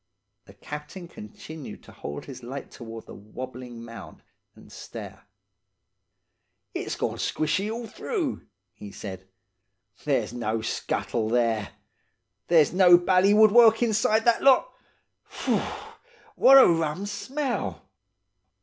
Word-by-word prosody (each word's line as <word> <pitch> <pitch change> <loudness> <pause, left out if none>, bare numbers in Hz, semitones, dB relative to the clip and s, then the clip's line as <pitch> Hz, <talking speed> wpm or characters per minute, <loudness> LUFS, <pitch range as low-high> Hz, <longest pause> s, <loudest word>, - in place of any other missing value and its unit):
The - - -17
captain 150 +5 -8
continued 150 +3 -10
to - - -15
hold 75 - -7
his 130 -3 -10
light 130 +3 -8
towards 115 -2 -10
the - - -11
wobbling 120 +2 -9
mound 110 -9 -11 0.3
and - - -17
stare. - - -10 1.5
"'It's - - -4
gone - - -3
squashy 185 +7 -1
all 230 +2 -5
through,' 325 - -4 0.3
he 105 - -11
said. 95 -2 -9 0.8
'There's - - 0
no 115 -2 -2
scuttle 115 0 -2
there. 115 -3 0 0.7
There's 165 -3 +4
no 180 -1 +7
bally 185 +3 +3
woodwork 225 +1 +6
inside 220 -1 +2
that 235 -1 +3
lot! 275 - +4 0.5
Phoo! - - -1 0.8
What 270 - +7
a 265 - +9
rum 165 +2 0
smell! 260 +6 -4
155 Hz, 115 wpm, -26 LUFS, -, 1.5 s, a